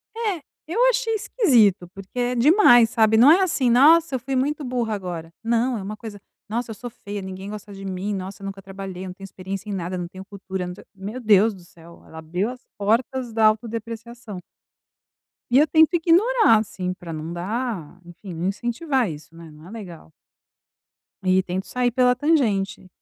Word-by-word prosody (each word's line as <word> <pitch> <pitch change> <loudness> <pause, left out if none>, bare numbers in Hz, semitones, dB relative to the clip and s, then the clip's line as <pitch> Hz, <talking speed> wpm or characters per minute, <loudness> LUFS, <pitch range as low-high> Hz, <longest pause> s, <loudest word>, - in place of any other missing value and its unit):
É, 425 -7 -2 0.3
eu 350 +8 -3
achei - - 0
esquisito, 235 - +3
porque 195 +5 -8
é 245 0 0
demais, 245 - +6
sabe? 220 -1 +3
Não 255 +6 +8
é 360 +4 +5
assim: 310 -9 +1
"Nossa, 295 +5 +5
eu - - -1
fui 265 +3 -4
muito 290 +3 0
burra 245 -4 -2
agora", 175 -5 -5
não 235 +2 +1
é - - -5
uma 210 +2 -6
coisa, 215 -2 -8 0.3
"Nossa, 230 +1 -3
eu - - -7
sou 245 +4 -7
feia 205 -3 -7
ninguém 190 +1 -7
gosta 210 -1 -8
de 195 0 -9
mim, 190 +2 -3
nossa 195 +1 -6
eu 195 - -7
nunca 195 0 -6
trabalhei, 190 -1 -8
não 180 - -7
tenho 195 +1 -11
experiência 195 +2 -7
em - - -3
nada, 185 -1 -3
não 175 -1 -4
tenho 190 +2 -11
cultura, 190 -2 -6
não 180 - -6
tenho", 185 - -15
meu 205 +6 -6
Deus 215 -1 +4
do 185 - -14
céu 170 0 -17
ela 160 - -11
abriu 180 +7 -2
as 250 0 -8 0.2
portas 235 +4 0
da 220 0 +3
autodepreciação. 230 0 -2 1.1
E 245 - +4
eu 300 - +6
tento 320 +2 +4
ignorar, 350 - +4
assim, 185 -4 -3
pra 170 -2 -9
não 155 +2 -6
dar 190 - -4
enfim 175 +2 -10
não 170 +3 -2
incentivar 240 - -1
isso, 155 0 -10
né, 165 -1 -12
não 155 +2 -15
é - - -12
legal. 180 - -10 1.1
E 185 0 +3
tento 185 +1 -4
sair 250 -1 0
pela 250 0 +3
tangente. 220 - 0
215 Hz, 195 wpm, -23 LUFS, 190-250 Hz, 1.1 s, Não